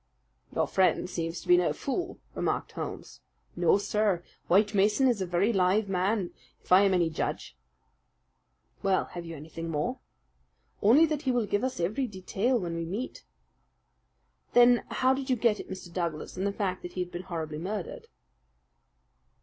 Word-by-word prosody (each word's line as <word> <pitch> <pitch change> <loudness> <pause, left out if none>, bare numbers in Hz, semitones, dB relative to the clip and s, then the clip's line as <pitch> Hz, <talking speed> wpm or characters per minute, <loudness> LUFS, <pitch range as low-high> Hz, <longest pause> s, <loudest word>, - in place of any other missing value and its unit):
"Your - - +2
friend 190 -1 +2
seems 165 -1 -4
to - - -14
be 175 - +7
no 175 -4 +2
fool," 345 - -3 0.2
remarked - - -2
Holmes. - - -7 0.3
"No, 175 +1 +4
sir, 205 -3 0 0.2
White 205 +4 +4
Mason 210 +6 +3
is 235 -6 +1
a 185 - -1
very 180 +6 +2
live 195 +2 +2
man, 190 0 0 0.3
if - - -21
I 185 +2 +8
am 195 -2 +4
any 175 -2 +3
judge." - - -3 1.3
"Well, 195 -1 +2
have 175 -1 -6
you 165 - -6
anything 160 +2 -7
more?" 165 - -2 0.8
"Only 255 +11 +6
that 305 -2 -2
he 265 - 0
will 240 -3 +1
give 205 +2 0
us 260 -1 -2
every 215 +10 0
detail 210 +5 -1
when 170 -4 -3
we 165 - -2
meet." 200 +10 -5 1.3
"Then 245 0 +6
how 260 +1 +2
did 265 0 -4
you 255 - +4
get 230 -2 +2
at - - -8
Mr. 185 -2 -8
Douglas 170 -4 -3
and 190 +2 -1
the - - 0
fact 195 -3 -2
that 175 - -8
he 185 - -2
had 180 0 -4
been 175 - -5
horribly 160 -4 -5
murdered?" 215 - -5
195 Hz, 175 wpm, -29 LUFS, 175-230 Hz, 1.3 s, I